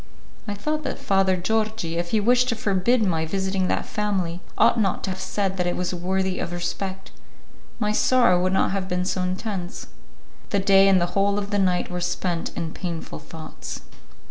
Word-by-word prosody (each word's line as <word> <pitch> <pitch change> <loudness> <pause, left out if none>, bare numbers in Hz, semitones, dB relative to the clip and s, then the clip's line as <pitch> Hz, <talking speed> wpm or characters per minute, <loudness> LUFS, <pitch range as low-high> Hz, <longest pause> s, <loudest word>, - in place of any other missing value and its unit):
I 205 - -2
thought 305 +9 -2
that - - -2
Father 195 -1 +2
Georgi, 215 -3 -1
if 170 0 -2
he 220 - +2
wished 245 +4 +3
to 230 - +1
forbid 220 +3 +2
my 165 -5 +1
visiting 190 +2 -1
that - - 0
family, 190 -5 -2 0.2
ought 230 - +4
not 195 -4 0
to 190 - -1
have 185 - -5
said 190 0 -1
that 180 -1 0
it 175 - 0
was 180 0 -2
worthy 190 +1 -1
of - - -3
respect; 185 +2 -4 0.7
my 210 -2 0
sorrow 215 -5 +4
would 185 +1 +1
not - - +2
have 195 -1 -2
been 180 0 0
so 185 0 -1
intense. 185 0 -3 0.6
The 200 - +1
day 195 0 +5
and 190 -1 +5
the 175 - +2
whole 200 0 +2
of 205 0 -3
the 205 - +1
night 180 -2 +1
were 180 0 -3
spent 175 -1 -1
in 160 -1 -3
painful 170 -3 -5
thoughts. 160 -1 -8
190 Hz, 195 wpm, -24 LUFS, 180-205 Hz, 0.7 s, day